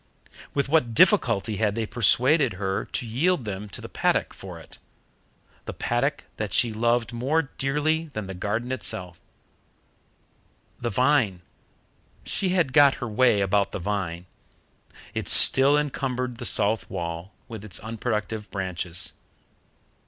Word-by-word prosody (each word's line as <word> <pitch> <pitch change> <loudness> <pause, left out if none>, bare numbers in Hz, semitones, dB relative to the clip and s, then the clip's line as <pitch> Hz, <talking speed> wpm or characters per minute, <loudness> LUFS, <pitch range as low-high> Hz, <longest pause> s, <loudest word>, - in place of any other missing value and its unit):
With 140 -1 +1
what 135 -6 +1
difficulty 115 - +3
had 105 -1 0
they 115 -1 -1
persuaded 125 - +3
her 95 0 -3
to 125 - -4
yield 135 +5 0
them 105 0 -5
to - - -7
the - - -7
paddock - - 0
for - - -10
it - - -14 0.9
the - - -5
paddock 135 +4 -1
that 105 -3 -4
she 115 -2 +2
loved 120 +1 0
more 135 +8 0 0.2
dearly 155 +4 0
than 110 -2 -4
the 95 - -7
garden 110 +7 -3
itself! 90 -9 -2 1.6
The 120 - -2
vine 115 -6 +1 0.8
she 190 - -1
had 175 -8 +1
got 145 -1 +6
her 120 - -5
way 110 -1 +3
about 100 +1 +1
the - - -2
vine. 90 -3 -3 0.9
It - - -4
still 140 +2 +7
encumbered 125 -4 -2
the 120 - -5
south 110 0 +1
wall 85 +2 -5 0.2
with 110 -3 -8
its 105 -4 -3
unproductive 110 -1 -4
branches. 90 -2 -4
115 Hz, 135 wpm, -25 LUFS, 100-135 Hz, 1.6 s, still